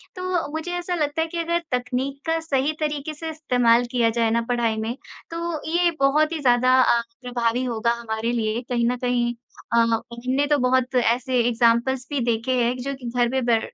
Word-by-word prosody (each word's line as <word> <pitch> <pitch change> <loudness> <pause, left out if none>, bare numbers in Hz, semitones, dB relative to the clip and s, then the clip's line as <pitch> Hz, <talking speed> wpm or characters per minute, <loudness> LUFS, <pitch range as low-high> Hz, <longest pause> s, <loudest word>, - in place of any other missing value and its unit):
तो 365 -3 -2
मुझे 320 +3 -4
ऐसा 355 0 -2
लगता 305 0 -1
है 325 - 0
कि 340 - -6
अगर 340 +1 0
तकनीक 250 +3 -2
का 325 0 +1
सही 290 -2 0
तरीके 300 0 -2
से 320 +2 -6
इस्तेमाल 245 -6 +2
किया 235 -2 +2
जाए 230 0 +1
ना 235 0 +2
पढ़ाई 230 -2 +1
में, 225 +3 -3 0.3
तो 335 -2 -4
ये 345 0 +3
बहुत 305 +3 +3
ही 325 - -3
ज़्यादा 255 -1 +3
अ, 235 -2 +3 0.2
प्रभावी 245 0 -1
होगा 235 -1 0
हमारे 225 0 -2
लिए 225 0 -1
कहीं 235 -1 +1
न 250 - -1
कहीं 240 -1 0 0.4
अ, - - +4
हमने 235 +4 0
तो 295 -1 +3
बहुत 255 0 +1
ऐसे 245 +2 +1
एग्ज़ाम्पल्स 240 +2 +2
भी 290 -2 -1
देखे 230 +3 -2
हैं 235 - +2
एक 250 0 -5
जो 275 0 -3
कि 245 -3 -7
घर 240 -1 +3
पे 265 0 0
बै 235 -2 +3
250 Hz, 200 wpm, -23 LUFS, 235-300 Hz, 0.4 s, अ